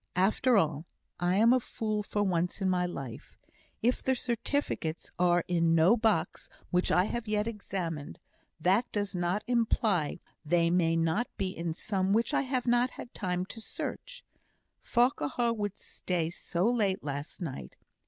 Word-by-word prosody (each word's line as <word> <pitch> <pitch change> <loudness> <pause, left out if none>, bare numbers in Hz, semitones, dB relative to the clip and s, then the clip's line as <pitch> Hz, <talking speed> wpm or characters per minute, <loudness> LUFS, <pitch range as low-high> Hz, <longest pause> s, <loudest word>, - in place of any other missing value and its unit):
"After 220 +6 +3
all, 155 -2 +1 0.3
I 175 +1 +2
am 230 +4 +6
a 255 - +4
fool 215 -3 -2
for 205 0 -1
once 180 -1 0
in 190 - 0
my 180 -1 +1
life. 135 -9 -8 0.5
If 245 +2 +2
the 260 - +1
certificates 235 - -2
are 175 -1 +3
in 170 -2 +2
no 165 +7 +6
box 215 -7 0 0.2
which 180 0 +2
I 180 - +5
have 225 +3 -3
yet 210 0 +1
examined, 185 -9 -4 0.4
that 190 +9 +2
does 205 -1 -2
not 180 +3 0
imply 220 - +1 0.2
they 170 +1 +2
may 165 -2 +3
not 165 +9 +1
be 190 -2 -2
in 165 -1 -3
some 190 0 -1
one 195 - +2
which 230 +2 +1
I - - +3
have 260 -2 -1
not 245 +1 +3
had 245 - -10
time 180 -2 -2
to 225 +3 -8
search. - - -6 0.6
Farquhar 240 - +1
would 205 -3 -3
stay 170 -3 -3
so 175 +2 -1
late 210 -6 +1
last 145 0 -5
night! 130 - -6
190 Hz, 165 wpm, -30 LUFS, 170-230 Hz, 0.6 s, am